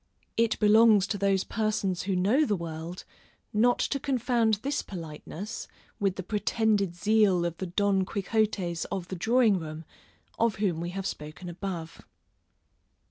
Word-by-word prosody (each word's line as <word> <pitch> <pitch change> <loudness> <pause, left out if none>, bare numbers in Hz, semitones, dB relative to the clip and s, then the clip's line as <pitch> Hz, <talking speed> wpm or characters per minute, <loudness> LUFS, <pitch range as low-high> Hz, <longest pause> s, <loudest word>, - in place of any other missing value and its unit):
It 230 -1 +2
belongs 215 -1 +6
to 205 0 -3
those 195 -1 +2
persons 210 -4 -1
who 190 0 -1
know 210 +12 +3
the 215 -8 +1
world, 170 0 -6 0.5
not 240 +3 +4
to 275 - -1
confound 240 -4 +1
this 280 +2 0
politeness, 175 +4 -7 0.3
with 195 -2 +1
the 190 - -5
pretended 210 -2 +1
zeal 205 -2 +3
of 170 -1 -3
the 190 - -4
Don 195 +1 +2
Quixottes 195 -3 -1
of 180 -2 -4
the 190 - -4
drawing 220 +1 +3
room, 160 0 -7 0.5
of 230 -2 +2
whom 185 -5 -1
we 175 - -3
have 195 +1 -5
spoken 155 +2 -6
above. 175 -2 -6
195 Hz, 145 wpm, -28 LUFS, 175-220 Hz, 0.5 s, belongs